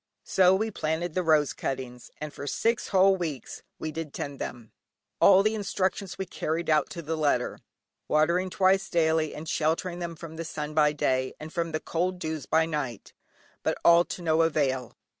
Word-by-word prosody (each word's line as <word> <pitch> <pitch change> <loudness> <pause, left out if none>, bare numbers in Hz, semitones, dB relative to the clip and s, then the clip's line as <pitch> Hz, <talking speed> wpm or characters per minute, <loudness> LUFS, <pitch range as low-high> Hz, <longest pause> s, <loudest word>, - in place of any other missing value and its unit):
So 185 0 +4
we 220 +3 -1
planted 160 -1 -2
the 185 - +1
rose 155 -5 +3
cuttings, 125 -2 -5
and 150 -1 -6
for 145 - -7
six 230 +9 0
whole 195 0 +5
weeks 155 -9 -5 0.2
did 155 -1 -5
we 165 0 -2
tend 140 -1 -6
them. 115 -3 -6 0.5
All 195 0 +7
the 215 +1 +2
instructions 195 -2 -2
we 190 - -3
carried 165 -1 -2
out 155 -1 +3
to 170 - -7
the 160 +2 -2
letter, 145 -5 0 0.5
watering 170 +5 +2
twice 190 +1 +2
daily 160 -2 +1
and 155 +2 -7
sheltering 170 +3 -1
them 170 -1 -4
from 160 0 -9
the 165 - -3
sun 150 -1 -5
by 150 -1 +4
day, 130 -3 0
and 155 +1 -9
from 170 -2 -1
the 155 - -1
cold 180 +3 -1
dews 160 -5 -4
by 160 +1 +3
night, 145 -8 -4 0.5
but - - -1
all 170 0 +7
to 175 - -7
no 160 0 +3
avail. 135 -7 0
160 Hz, 185 wpm, -27 LUFS, 150-180 Hz, 0.5 s, All